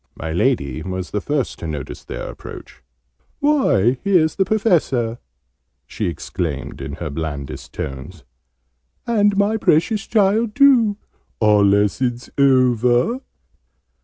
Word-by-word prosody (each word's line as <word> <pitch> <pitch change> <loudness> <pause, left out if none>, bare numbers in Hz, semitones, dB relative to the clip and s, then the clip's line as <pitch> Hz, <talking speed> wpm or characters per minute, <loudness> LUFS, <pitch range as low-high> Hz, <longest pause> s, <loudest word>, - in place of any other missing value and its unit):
My 80 +1 -5
Lady 80 - 0
was 95 -1 -5
the 105 - -2
first 145 -4 -2
to 85 - -5
notice 75 -4 -6
their - - -6
approach. - - -11 0.6
"Why, 135 - +2
here's 180 -6 +3
the 190 - +1
Professor!" 165 - +1 0.7
she 105 -1 -4
exclaimed 80 -2 -4
in - - -6
her - - -5
blandest 75 -3 -6
tones. 70 +5 -7 0.8
"And 205 -3 +2
my 205 +2 +2
precious 210 +4 +1
child 210 +1 +2
too! 245 -7 +5 0.4
Are 105 -2 +4
lessons 105 +5 +1
over?" 130 - +3
125 Hz, 115 wpm, -20 LUFS, -, 0.8 s, too